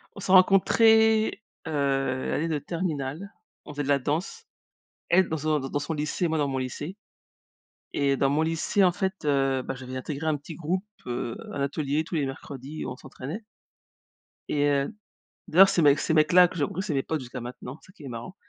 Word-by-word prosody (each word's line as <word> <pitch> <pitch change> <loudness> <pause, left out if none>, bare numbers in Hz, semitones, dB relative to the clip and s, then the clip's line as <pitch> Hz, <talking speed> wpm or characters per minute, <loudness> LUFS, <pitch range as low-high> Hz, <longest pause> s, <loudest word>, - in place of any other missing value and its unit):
On - - -9
s'est 185 - -3
rencontrées, 220 +4 +5 0.2
heu, 160 - -3 0.6
l'année 165 +3 0
de 155 -2 0
terminale. 165 +2 -4 0.3
On 150 - -9
faisait 145 - -3
de 135 - -5
la 140 -1 +3
danse. 170 - -3 0.6
Elle 185 0 +4
dans 160 - -1
son 155 0 0
d 135 - -5
dans 145 - 0
son 160 +2 -3
lycée 150 +3 -1
moi 160 - -1
dans 145 - +1
mon 135 -1 -2
lycée. 145 - -5 1.0
Et 140 -1 +1
dans 135 0 +2
mon 150 +2 +2
lycée, 165 +5 +1
en 180 - +4
fait, 190 +3 -1
heu 135 -2 +1
bah, 135 - -4
j'avais 130 0 -8
intégré 145 +4 -4
un 155 -2 +2
petit 145 +3 -10
groupe, 180 +4 -2 0.2
heu, 120 +5 -3 0.2
à - - -5
l'atelier 140 +2 -1
tous 165 +1 -4
les 145 - 0
mercredis, 135 +2 -7
où - - -4
on 125 - -7
s'entraînait. 145 - -7 1.1
Et 145 -1 +1
heu 140 +7 +1 0.6
d'ailleurs 190 +4 +7
ces 180 -4 +2
mecs 145 -1 +5
ces 160 - 0
mecs 155 +1 +3
là 180 0 +8
que 180 - -10
j'ai 145 - +1
rencontré 175 +6 -3
c'est 190 -7 -3
mes 135 - +1
potes 160 -2 -2
jusqu'à 125 0 -7
maintenant, 125 +3 -8
c'est - - -20
ça - - -16
qui 170 -6 -15
est - - -6
marrant. 120 +9 -7
150 Hz, 215 wpm, -26 LUFS, 140-180 Hz, 1.1 s, là